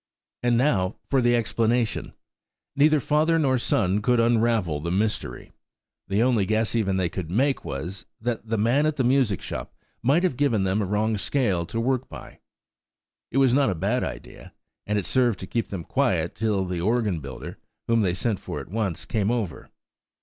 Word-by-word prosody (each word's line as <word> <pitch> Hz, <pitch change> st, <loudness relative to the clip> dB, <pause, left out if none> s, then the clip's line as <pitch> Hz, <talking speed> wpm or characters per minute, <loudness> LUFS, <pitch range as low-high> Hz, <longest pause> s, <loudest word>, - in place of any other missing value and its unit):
And 120 Hz, -1 st, +2 dB
now 105 Hz, -8 st, +1 dB, 0.2 s
for 135 Hz, -2 st, +4 dB
the 120 Hz, 0 st, +3 dB
explanation. 115 Hz, 0 st, 0 dB, 0.6 s
Neither 150 Hz, +1 st, +4 dB
father 155 Hz, +4 st, +2 dB
nor 135 Hz, -5 st, +2 dB
son 105 Hz, -3 st, +1 dB
could 120 Hz, +3 st, +2 dB
unravel 115 Hz, -8 st, +2 dB
the 85 Hz, +3 st, -4 dB
mystery. 95 Hz, -, -2 dB, 0.6 s
The 100 Hz, +4 st, +2 dB
only 120 Hz, -6 st, +2 dB
guess 110 Hz, +1 st, +1 dB
even 100 Hz, -5 st, +1 dB
that 95 Hz, -, +1 dB
they 85 Hz, -, 0 dB
could 85 Hz, -3 st, -5 dB
make 135 Hz, +9 st, +1 dB
was, 85 Hz, +8 st, -5 dB
that 115 Hz, 0 st, -3 dB
the 115 Hz, 0 st, 0 dB
man 120 Hz, +8 st, +2 dB
at 155 Hz, -, 0 dB
the 135 Hz, -, 0 dB
music 125 Hz, -6 st, +2 dB
shop -, -, -6 dB, 0.3 s
might 140 Hz, +9 st, +3 dB
have 175 Hz, -9 st, 0 dB
given 120 Hz, -9 st, +2 dB
them 95 Hz, +3 st, +1 dB
a -, -, 0 dB
wrong 105 Hz, +2 st, 0 dB
scale 100 Hz, -10 st, 0 dB
to 115 Hz, -, -3 dB
work 130 Hz, +2 st, 0 dB
by. -, -, -11 dB, 0.9 s
It 130 Hz, -, -3 dB
was 135 Hz, -3 st, +4 dB
not 140 Hz, 0 st, +3 dB
a 95 Hz, -, -1 dB
bad 80 Hz, -, 0 dB
idea, -, -, -8 dB, 0.3 s
and 105 Hz, 0 st, 0 dB
it 100 Hz, -, -1 dB
served 120 Hz, -5 st, +2 dB
to -, -, -4 dB
keep 115 Hz, +4 st, -2 dB
them 95 Hz, -4 st, -5 dB
quiet 90 Hz, -, 0 dB
till 105 Hz, -4 st, 0 dB
the 90 Hz, -2 st, -3 dB
organ 105 Hz, -3 st, +1 dB
builder, 70 Hz, -3 st, -8 dB, 0.3 s
whom 115 Hz, -1 st, +2 dB
they 90 Hz, -4 st, +1 dB
sent 105 Hz, +1 st, -1 dB
for -, -, -6 dB
at -, -, -9 dB
once, 105 Hz, -6 st, -2 dB
came 105 Hz, -2 st, 0 dB
over. 115 Hz, -8 st, -3 dB
110 Hz, 190 wpm, -25 LUFS, 95-125 Hz, 0.9 s, for